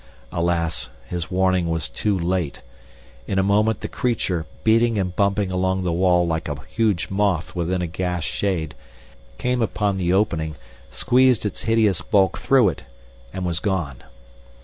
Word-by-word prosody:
Alas, 85 -6 -1 0.2
his 85 +2 -4
warning 95 -2 +1
was 80 -6 -1
too 95 - -1
late! 85 -3 -2 0.6
In 95 - -1
a 95 - +3
moment 105 +3 +2
the - - -3
creature, 95 -9 -1 0.2
beating 115 0 +3
and 90 -2 -1
bumping 100 -1 +1
along 95 0 0
the 90 - 0
wall 90 0 +3
like 80 -2 -2
a 75 - -3
huge 100 -6 0
moth 95 -4 0
within 90 +1 -1
a - - 0
gas 90 0 -2
shade, 80 -6 -2 0.6
came 125 - 0
upon 100 -2 0
the 90 -1 +1
opening, 85 -6 +1 0.3
squeezed 125 - +3
its 105 - -2
hideous 110 -5 +2
bulk 95 -3 +2
through 130 -7 +4
it, - - -7 0.5
and 95 +3 -4
was 85 -2 -1
gone. 85 -11 -2
95 Hz, 155 wpm, -22 LUFS, 85-105 Hz, 0.6 s, through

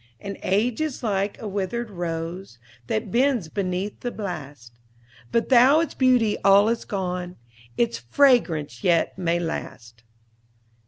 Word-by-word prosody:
"And 200 0 -7
age 220 +7 0
is 310 -6 -3
like 200 -2 -1
a 220 - -6
withered 205 +4 -3
rose, 170 -4 -5 0.3
That 215 -2 -2
bends 245 - +1
beneath 190 +2 -3
the 245 - -3
blast; 145 - -7 0.6
But 230 - 0
though 265 +4 +6
its 325 -3 -1
beauty 250 -5 +2
all 200 +2 +6
is 235 - -2
gone, 180 -3 -4 0.4
Its 115 -1 0
fragrance 155 - +2
yet 170 -2 +2
may 170 -1 +1
last." 115 -9 -6
195 Hz, 130 wpm, -24 LUFS, 170-235 Hz, 0.6 s, though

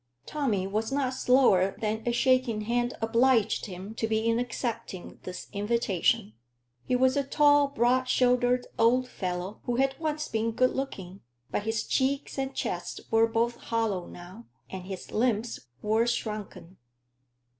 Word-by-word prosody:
Tommy 240 -11 -1
was 215 +5 -2
not 270 -2 0
slower 245 -8 +3
than 220 0 -1
a - - +3
shaking 255 -2 +2
hand 240 +3 -1
obliged 230 -1 +2
him 190 +2 -8
to 225 0 -2
be 220 0 0
in 230 0 +2
accepting 230 -5 -4
this 180 0 -6
invitation. 200 - +1 0.5
He 250 - 0
was 260 +1 +3
a 280 - +2
tall, 290 +1 +4
broad 255 -1 +2
shouldered 250 0 +3
old 250 +3 +4
fellow, 185 -1 -4
who 245 - -1
had 270 +2 +1
once 305 -1 -2
been 225 +1 -1
good 255 +3 +3
looking; 195 -9 -5 0.3
but 205 - -2
his 225 -1 0
cheeks 275 +1 -1
and 270 0 -3
chest - - -3
were 225 0 +5
both 235 +1 0
hollow 225 -7 -2
now, 185 +7 -11 0.2
and 185 -1 -6
his 190 -2 -7
limbs 225 - -1 0.2
were 220 +2 +2
shrunken. 210 -6 -4
230 Hz, 150 wpm, -28 LUFS, 210-255 Hz, 0.5 s, were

